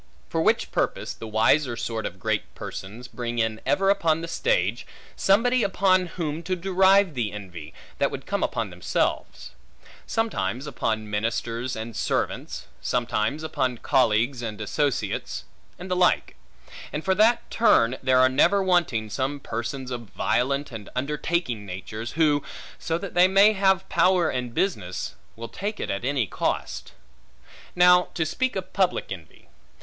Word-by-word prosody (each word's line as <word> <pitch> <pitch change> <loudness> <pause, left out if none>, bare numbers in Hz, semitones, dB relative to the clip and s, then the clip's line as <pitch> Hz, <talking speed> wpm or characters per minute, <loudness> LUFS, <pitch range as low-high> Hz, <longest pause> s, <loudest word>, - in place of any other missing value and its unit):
For - - 0
which - - +2
purpose, - - -1
the 115 - -9
wiser 115 +4 +2
sort 115 -1 -3
of - - -9
great - - -2
persons, 110 +6 -7
bring 120 0 -5
in 110 -1 0
ever 195 +8 +3
upon 165 -5 +1
the 165 - -5
stage - - 0 0.3
somebody 240 +6 +3
upon 185 -2 +2
whom 165 -2 -4
to 185 +2 -2
derive 190 0 +4
the 115 -6 -2
envy, 90 -7 -9 0.3
that - - +3
would - - -7
come - - -2
upon - - -1
themselves; - - -2 0.6
sometimes 220 - -1
upon 110 -6 -2
ministers 115 +3 -2
and 110 0 -6
servants; - - -2 0.2
sometimes 120 +4 -1
upon 130 -6 -1
colleagues 120 +1 +2
and 110 -3 -5
associates; 135 +6 -2 0.3
and 180 +1 -8
the - - +2
like; 180 0 +2 0.6
and 150 - -4
for 190 - +3
that 220 +5 +3
turn 130 - +4
there 130 -1 +3
are 130 - +7
never 175 +10 +3
wanting, 170 -12 +1
some 130 +6 -2
persons 130 +2 -5
of 120 -4 -6
violent 140 +3 0
and 110 -4 -8
undertaking 145 - -1
natures, 100 +5 -6
who, 150 -2 +3 0.4
so 165 0 -1
they 180 0 +3
may 200 +3 +6
have 190 -2 +2
power 180 -3 +3
and 125 -2 -4
business, 90 - -2 0.2
will 115 +1 -7
take 205 - -5
it - - -2
at 100 +4 -3
any 135 -2 +1
cost. - - -3 0.8
Now, 180 0 +6
to 160 - 0
speak 255 +11 -1
of 190 -1 -5
public 190 -2 0
envy. 85 -6 -10
140 Hz, 150 wpm, -25 LUFS, 115-185 Hz, 0.8 s, are